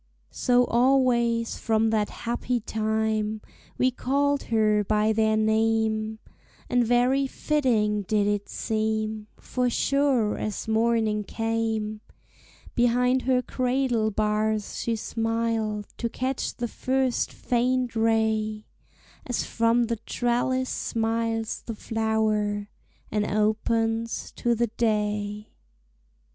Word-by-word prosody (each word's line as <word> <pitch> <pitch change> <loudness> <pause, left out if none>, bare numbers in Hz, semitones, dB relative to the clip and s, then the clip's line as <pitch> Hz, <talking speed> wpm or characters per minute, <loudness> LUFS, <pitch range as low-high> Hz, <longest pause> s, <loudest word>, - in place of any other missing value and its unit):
So 245 0 +3
always 240 -2 +2
from 220 0 +1
that 215 -2 +1
happy 240 +1 -2
time 220 0 -1 0.4
We 255 0 +3
called 280 +3 0
her 215 -2 +2
by 215 +1 +2
their 220 0 +2
name, 220 0 +1 0.5
And 245 -1 +4
very 250 +4 +2
fitting 235 -9 +1
did 205 +1 +1
it 205 0 -1
seem, 220 -1 -2
For 250 -1 -1
sure 270 -4 +1
as 215 +1 -4
morning 220 -1 +1
came, 225 -1 -2 0.7
Behind 250 +2 +2
her 250 0 +1
cradle 250 -4 0
bars 215 0 -1
she 230 - -1
smiled 225 -1 -1
To 235 - -2
catch 255 +2 -2
the 240 - -3
first 260 +1 0
faint 250 0 0
ray, 220 -1 +1 0.6
As 245 - -1
from 230 +1 +2
the 230 0 -1
trellis 245 +3 -1
smiles 225 -1 -1
the 230 - -4
flower 215 -2 -1 0.4
And 210 0 +1
opens 225 +2 0
to 235 0 0
the 235 +1 +2
day. 210 -2 -1
225 Hz, 105 wpm, -26 LUFS, 215-240 Hz, 0.7 s, And